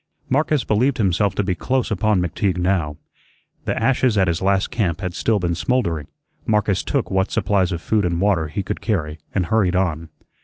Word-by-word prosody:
Marcus 150 -1 +1
believed 125 +6 +1
himself 100 -1 +1
to 105 - +1
be 95 -1 0
close 130 +8 -1
upon 105 -1 +2
McTeague 90 +2 -1
now. 90 -5 0 0.7
The - - -1
ashes 130 -4 +2
at 95 -2 +3
his 85 -1 0
last 95 0 +1
camp 90 -7 -1
had 90 -2 -3
still 110 +4 +1
been 90 -3 -1
smoldering. 85 - -1 0.4
Marcus 105 -3 +2
took 140 -7 -2
what 95 +1 +1
supplies 95 -3 +1
of 85 -1 -4
food 110 -2 +1
and 85 -1 0
water 95 -5 +2
he 75 +6 -3
could - - -4
carry, 80 -8 -2 0.2
and 95 -2 +1
hurried 95 -1 +1
on. 85 -4 -1
95 Hz, 190 wpm, -21 LUFS, 85-110 Hz, 0.7 s, at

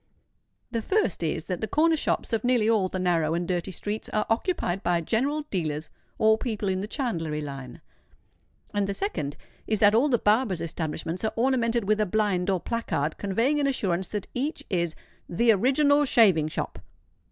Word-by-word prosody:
The 230 -1 -1
first 380 - 0
is 160 -1 -1
that 180 -1 -4
the 220 - -1
corner 320 +5 +3
shops 295 - -1
of 220 - 0
nearly 245 -3 +2
all 210 -5 +2
the 185 - -4
narrow 170 -3 +1
and 175 0 -2
dirty 175 0 -1
streets 205 +4 -5
are 215 - 0
occupied 225 - 0
by 175 -2 +1
general 275 - 0
dealers 155 -4 -2 0.3
or 220 0 +4
people 215 -5 -2
in 185 0 -1
the 205 - -4
chandlery 165 - -2
line; 135 -4 -7 0.9
and 205 -1 0
the 200 - -2
second 145 - -2 0.3
is 215 -2 +1
that 205 0 +6
all 250 +7 +4
the 245 - +3
barbers' 210 -4 +2
establishments 165 +2 -4
are 220 - 0
ornamented 235 -2 +1
with 215 +2 +1
a 210 - +1
blind 195 -2 +1
or 190 -2 +2
placard 165 -9 -2
conveying 230 +9 +1
an 285 - +2
assurance 190 -9 -1
that 205 -2 -4
each 280 +6 -3
is 170 -3 0 0.3
"the 230 +7 +3
original 285 +7 +4
shaving 195 - +4
shop." 155 - -4
210 Hz, 180 wpm, -26 LUFS, 175-235 Hz, 0.9 s, that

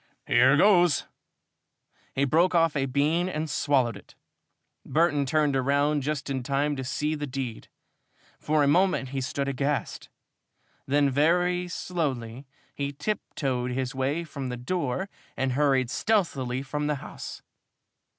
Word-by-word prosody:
"Here - - +5
goes!" 175 -7 +5 1.1
He 140 - +2
broke 170 +6 +3
off 165 -2 +3
a 135 -2 +1
brown 130 - -6
bean 155 +6 +1
and 155 -2 -3
swallowed 130 -5 +1
it. 100 - -14 0.7
Burton 150 -4 +1
turned 150 0 +2
round 140 +3 +2
just 145 +1 -3
in 135 -2 -2
time 140 +3 0
to 130 - -3
see 150 +4 -1
the 150 -1 -4
deed. 130 -4 -5 0.7
For 150 -1 +2
a - - +3
moment 175 -3 +2
he 135 0 -3
stood 140 +2 -2
aghast. 140 +2 -2 0.8
Then 140 0 +3
very 175 +5 +2
slowly 135 -9 -3 0.3
he 140 0 -3
tiptoed 135 -6 -2
his 130 +1 -2
way 135 +5 -1
from 140 -5 -6
the 125 - -4
door 155 +5 -2 0.3
and 135 0 0
hurried 135 -2 +2
stealthily 135 - 0
from 150 +2 -3
the 150 - +1
house. 135 - -8
140 Hz, 140 wpm, -27 LUFS, 130-155 Hz, 1.1 s, Here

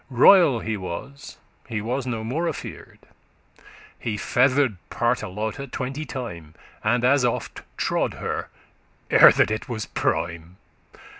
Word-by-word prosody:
Royal 135 - +6
he 110 -1 -3
was, 100 +10 -8 0.3
he 110 -3 -2
was 125 +5 -3
no 115 -3 -3
more 150 +10 -2
afear'd; 160 - -7 0.9
He 110 -3 -3
feather'd 130 0 +2
Partelote 120 +2 -2
twenty 135 +4 -4
time, 85 - -7 0.3
And 120 +3 +2
as 135 +1 +4
oft 120 - -2 0.2
trode - - 0
her, - - -4 0.6
ere - - +9
that - - +2
it 110 +5 -3
was 110 -3 -3
prime. 85 +1 -2
120 Hz, 125 wpm, -24 LUFS, 105-135 Hz, 0.9 s, ere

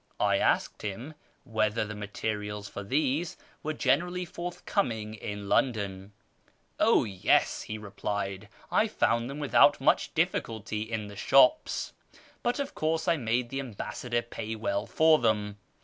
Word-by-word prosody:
I - - +3
asked - - +1
him 115 +9 -5 0.3
whether 110 -3 0
the 105 - -6
materials 105 0 -4
for - - -7
these 145 - 0 0.2
were 155 - -2
generally 180 +5 +1
forthcoming 170 - -2
in 105 -1 -6
London. 100 -5 0 0.3
" - - -32 0.3
Oh - - +5
yes," 95 -4 +2
he 110 - -5
replied, 100 -1 -4
" - - -25
I 220 - +3
found 115 - +1
them 140 - -6
without 145 -2 +5
much - - +2
difficulty 110 -1 -1
in 110 -1 -3
the 105 0 -10
shops, 135 - +3 0.5
but 240 - 0
of 280 -1 -3
course 160 +1 -1
I 170 - +3
made 120 -1 0
the 135 - -3
ambassador 120 0 -3
pay 110 -1 -5
well 100 -2 -2
for 160 0 +5
them. 105 -3 0
110 Hz, 150 wpm, -29 LUFS, 105-140 Hz, 0.5 s, Oh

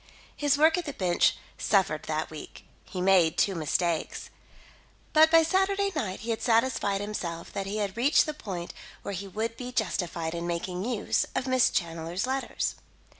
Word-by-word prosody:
His 290 -1 +2
work 320 +4 +5
at 350 - -5
the 290 - -4
bench 180 -2 +2 0.2
suffered 190 -7 +1
that 155 0 -2
week; 155 - -10 0.2
he 185 - -5
made 180 -4 +4
two 195 - +3
mistakes. 165 0 -1 0.8
But 315 +1 +7
by 330 0 +6
Saturday 390 +4 +1
night 210 -11 -3
he 230 +1 -3
had 225 - -2
satisfied 225 -4 +2
himself 175 -5 -5
that 195 -1 -3
he 205 +2 -3
had 205 -2 -2
reached 260 +6 +4
the 305 - -3
point 185 -10 -6 0.3
where 200 - -4
he 195 +1 -5
would 220 +4 -3
be 250 0 -6
justified 175 -7 -2
in 170 0 -3
making 180 +2 -3
use 240 -3 0
of - - 0
Miss 255 -1 +4
Challoner's 170 +3 -2
letters. 265 +1 -2
200 Hz, 175 wpm, -28 LUFS, 175-255 Hz, 0.8 s, But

